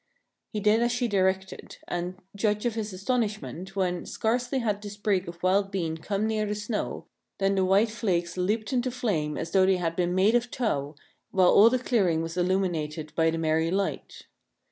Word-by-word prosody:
He 215 - -2
did 210 +2 +3
as 240 0 +2
she 245 0 0
directed; 190 -2 -1
and, 175 +1 -3 0.2
judge 210 +2 0
of 240 - +1
his 215 -1 -3
astonishment, 200 -3 -3
when, 180 -3 -1
scarcely 245 +4 -1
had 210 -5 -1
the 205 - -6
sprig 205 -3 -1
of 170 0 -9
wild 195 +2 +2
bean 170 -5 -2
come 200 +5 -2
near 215 -1 0
the 210 - -2
snow, 210 +1 -3 0.3
than 195 0 +1
the 190 -1 +2
white 200 +4 +3
flakes 180 -6 -1
leaped 215 +6 -1
into 255 0 +1
flame 195 -12 -1
as 165 +1 -4
though 190 -1 +4
they 190 -1 +3
had 165 -2 -2
been 175 0 0
made 195 +4 +4
of 240 0 +2
tow, 150 - -2 0.3
while 185 -2 +4
all 215 +3 +7
the 255 - +1
clearing 190 -10 +1
was 165 0 -5
illumined 170 -5 -1
by 160 +1 +3
the 165 - -2
merry 160 0 +1
light. 195 +2 -3
195 Hz, 190 wpm, -27 LUFS, 175-215 Hz, 0.3 s, all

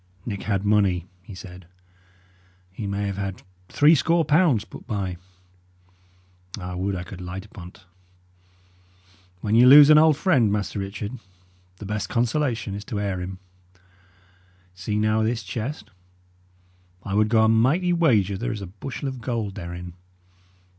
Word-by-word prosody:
"Nick 100 -4 -4
had 100 -2 -2
money," 100 -4 +2 0.2
he 95 +2 -11
said. 90 -1 -11 1.0
"He 100 +2 -6
may 100 +1 -2
have 100 -1 -4
had 100 -1 -5 0.3
three 150 +2 +5
score 165 +2 +2
pounds 145 - +3
put - - -13
by. 95 -4 -3 1.4
I 90 -1 -6
would 95 +2 -2
I 90 - -4
could 90 +1 -10
light 90 +2 -7
upon't! 95 -1 -13 1.6
When 105 - -2
ye 115 +2 +6
lose 145 +3 +9
an 150 - +8
old 155 -2 +5
friend, 130 - +2
Master 105 0 -2
Richard, 100 +5 -6 0.6
the 105 - -9
best 105 +1 -3
consolation 120 -3 -1
is 100 +1 -6
to 105 - -4
heir 100 -3 -2
him. 95 +1 -6 1.4
See, 95 +4 -3
now, 110 +1 +1
this 115 +1 -1
chest. 115 +9 -6 1.1
I 95 - -5
would 105 +1 +2
go 110 -1 +4
a - - +4
mighty 135 +12 +2
wager 105 - +2
there 120 +2 -2
is 110 -3 -5
a - - -5
bushel 110 +9 -7
of 130 -2 -6
gold 115 -5 -3
therein. 85 -2 -7
105 Hz, 150 wpm, -24 LUFS, 95-125 Hz, 1.6 s, lose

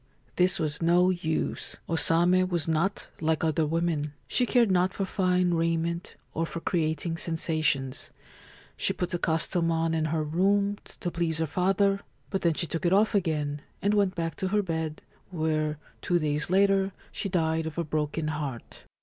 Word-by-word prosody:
This 185 +1 +3
was 155 -2 -1
no 175 +2 +4
use. 170 -3 -2
O 165 - 0
Same 175 +5 +3
was 170 -3 0
not 165 +5 0
like 160 0 0
other 160 -1 +1
women. 160 -2 -1
She 245 - +1
cared 235 -5 +4
not 185 +1 +2
for 195 - -1
fine 180 -2 +1
raiment 165 +1 -1 0.2
or 165 +1 -1
for 170 - -5
creating 165 -1 -1
sensations. 155 -5 -1 0.7
She - - 0
put 180 +1 -3
the 175 - -1
costume 165 +1 +1
on 165 0 +1
in 160 -1 +1
her 155 0 0
room, 200 +6 +1 0.2
to 175 - -2
please 170 -2 -1
her 160 - +1
father; 195 +4 +2 0.3
but 195 - -1
then 170 -2 +2
she 170 - +1
took 165 0 -3
it 175 - +3
off 210 +3 +4
again, 150 -6 0 0.2
and 205 +1 +1
went 200 -2 +2
back 165 -2 -2
to 190 - -1
her 205 +2 +1
bed, 160 -3 -3 0.3
where, 155 -3 -1 0.2
two 175 - +2
days 150 -1 -1
later, 195 0 +3 0.2
she 200 - -3
died 160 -2 0
of 160 - -7
a 170 - +1
broken 155 0 -2
heart. 145 -6 -5
165 Hz, 175 wpm, -28 LUFS, 160-185 Hz, 0.7 s, no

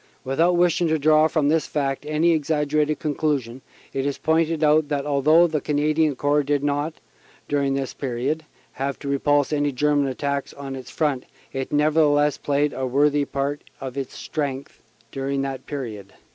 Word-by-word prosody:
Without 165 +7 +2
wishing 175 -1 +3
to 160 0 +2
draw 155 +1 +4
from 155 -3 +1
this 160 +1 +2
fact 140 -1 -2
any 155 +3 +2
exaggerated 150 -1 +1
conclusion, 140 -5 -2 0.3
it 135 - -1
is 140 0 -2
pointed 160 0 +1
out 155 0 +4
that 145 -1 -2
although 150 +4 +4
the 155 -3 -1
Canadian 150 0 +1
Corps 145 +2 +2
did 145 0 0
not, 145 +2 -1 0.5
dur 145 -1 0
ing 135 -1 0
this 135 -1 -3
period, 135 +4 -2 0.3
have 135 +1 -3
to 145 - -8
repulse 145 +1 +1
any 145 -1 +1
German 145 +1 +1
attacks 140 +1 -3
on 140 -1 -6
its 130 -2 -9
front, 145 -5 -1 0.3
it 135 -1 -4
nevertheless 150 -1 +3
played 145 0 0
a - - -8
part 130 -1 -2
worthy 145 +1 +2 0.5
of 130 -2 -6
its 135 -2 -5
strength 140 -3 -4 0.3
dur 135 0 -4
ing 140 0 0
that 135 -1 -5
period." 110 -9 -6
145 Hz, 175 wpm, -23 LUFS, 135-155 Hz, 0.5 s, draw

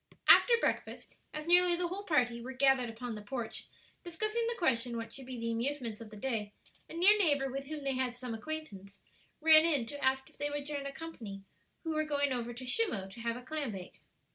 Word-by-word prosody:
After 480 - +8
breakfast, - - -2 0.2
as 305 0 -5
nearly 355 +1 +5
the 350 0 -1
whole 380 +3 -4
party 245 -8 +1
were 260 +3 -6
gathered 265 -2 +3
upon 230 +1 -6
the 210 - -7
porch, 225 +2 -5 0.4
discussing 430 +7 -1
the 470 0 -2
question 240 -7 +1
what 230 0 -6
should 265 -2 -8
be 255 -2 -6
the 230 0 -2
amusements 235 -2 -2
of 225 - -9
the 210 - -11
day, 210 -3 -2 0.4
a - - -9
near 375 +5 +7
neighbor 285 -7 +2
with 275 +1 -4
whom 300 -1 -6
they 275 -1 0
had 255 -1 -1
some 245 -1 -5
acquaintance, 220 -7 -7 0.4
ran 315 0 +8
in 295 -8 +2
to 285 +5 -7
ask 265 0 +1
if - - -20
they 290 0 0
would 290 -1 -4
join 285 -1 -4
a - - -5
company 230 -11 -8 0.4
who 325 - -2
were 310 0 +1
going 285 -2 0
over 240 -1 -3
to 240 +2 -8
Shimmo 250 - +1
to 225 - -11
have 230 0 -2
a 250 - -10
clam 290 -4 -3
bake. 185 -2 -10
265 Hz, 220 wpm, -32 LUFS, 235-310 Hz, 0.4 s, After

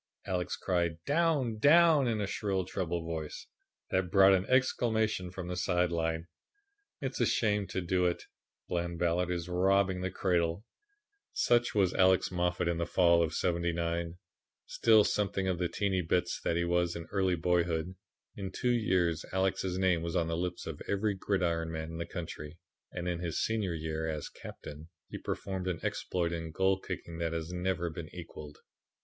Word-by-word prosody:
Alex 90 -2 -2
cried 85 -3 0
"Down! 145 -8 +1
Down!" 155 0 +6
in 110 -3 0
a - - 0
shrill, 95 -2 -1
treble 85 -3 -3
voice 80 -2 -5 0.5
that 95 -1 +1
brought 95 +1 +7
an 95 0 +1
exclamation 110 -7 +1
from 90 0 -7
the 90 - -3
side 90 -1 +1
line. 80 0 -1 0.8
"It's 135 -2 -3
a - - +5
shame 105 -5 +1
to 95 0 -3
do 90 +1 +1
it. 85 - -2 0.4
Bland 85 -1 -2
Ballard 90 +1 +1
is 85 -2 -2
robbing 95 +1 +2
the 95 - -1
cradle." 90 0 0 0.7
Such 120 -1 +2
was 95 -3 +3
Alex 95 -1 +4
Moffat 90 -1 0
in 85 -1 0
the 85 - -1
fall 85 -2 +4
of 80 -1 0
'79, 85 -1 -1 0.5
still 110 -2 +5
something 100 -2 0
of 90 -2 0
the 90 -1 0
"Teeny 95 -3 0
bits" 90 +1 0
that 85 - +1
he 85 - +1
was 85 0 +1
in 85 -1 -6
early 95 -2 +2
boyhood. 85 0 0 0.4
In 95 -1 -5
two 125 +5 0
years 90 -8 +1
Alex's 95 -1 0
name 95 -3 +2
was 85 0 -3
on 85 - +2
the 80 0 -2
lips 90 +1 -3
of 80 -3 -6
every 100 +1 +1
gridiron 85 -4 -1
man 80 0 -4
in 80 - -6
the 85 - -3
country, 80 -2 -7 0.3
and 90 0 -4
in 85 -1 -1
his 85 -2 -2
senior 105 -6 0
year, 80 0 -3
as 75 -2 -4
captain, 75 +3 -10 0.2
he - - -6
performed 95 -1 -4
an 90 -3 -1
exploit 85 -2 -1
in 80 -1 -4
goal 95 +4 +2
kicking 85 -3 -6
that 85 -1 -1
has 80 +1 -4
never 90 -1 -1
been 80 0 -7
equalled. 75 -4 -9
90 Hz, 175 wpm, -31 LUFS, 85-95 Hz, 0.8 s, brought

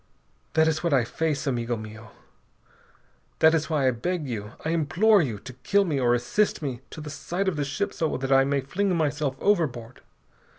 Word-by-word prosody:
That 160 0 +4
is 155 -1 0
what 170 -5 +2
I 130 - +3
face, 155 +3 -2
amigo 120 -3 -1
mio. 110 +1 -10 1.3
That 160 0 +5
is 165 0 0
why 145 -4 +2
I - - +4
beg 155 +6 -3
you, 105 -2 -5
I 160 - 0
implore 175 +6 +3
you, 120 -9 -2
to 130 +5 -10
kill 200 +11 +1
me 150 -6 -1
or 120 -1 +3
assist 160 - 0
me 130 -4 -4
to 155 - -9
the 150 -1 -7
side 180 +5 -3
of 190 - +1
the 145 - -1
ship 145 +9 -2
so 160 -2 -1
that 135 +1 -3
I 135 0 +6
may 140 0 0
fling 185 +7 -1
myself 145 -3 0
overboard! 130 - 0
145 Hz, 200 wpm, -26 LUFS, 125-165 Hz, 1.3 s, I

